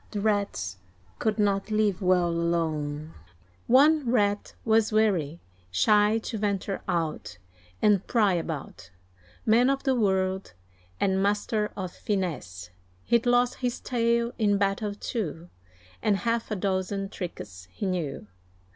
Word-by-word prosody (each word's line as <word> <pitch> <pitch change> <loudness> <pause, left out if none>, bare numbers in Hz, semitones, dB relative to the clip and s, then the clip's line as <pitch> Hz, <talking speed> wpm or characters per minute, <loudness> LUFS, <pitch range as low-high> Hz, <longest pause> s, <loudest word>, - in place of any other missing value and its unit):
The 210 - -4
Rats 200 - -1 0.4
could 220 0 0
not 200 -1 +1
leave 215 -3 +1
well 180 -2 +3
alone; 160 -3 -1 0.5
One 285 +1 +5
Rat 205 -4 +1
was 220 -1 +3
wary, 185 -8 +1 0.3
shy 210 - +4
to 225 - -4
venture 200 -1 -2
out, 160 - -2 0.5
And 205 -3 +3
pry 210 -5 +3
about 165 - -5 0.6
Man 235 +4 +4
of 275 0 0
the 265 - +2
world, 190 - 0 0.5
and 190 -1 +1
master 210 +1 0
of 185 -2 -4
finesse, 125 - -4 0.3
He'd 235 0 +2
lost 245 0 +3
his 245 -1 -2
tail 235 -1 +1
in 205 -2 +3
battle, 200 +1 0
too, 175 - -4 0.5
And 205 -2 +2
half 230 +1 -1
a 215 - -1
dozen 195 0 -1
tricks 100 - -7
he 200 - -5
knew. 170 - -2
200 Hz, 130 wpm, -27 LUFS, 175-220 Hz, 0.6 s, One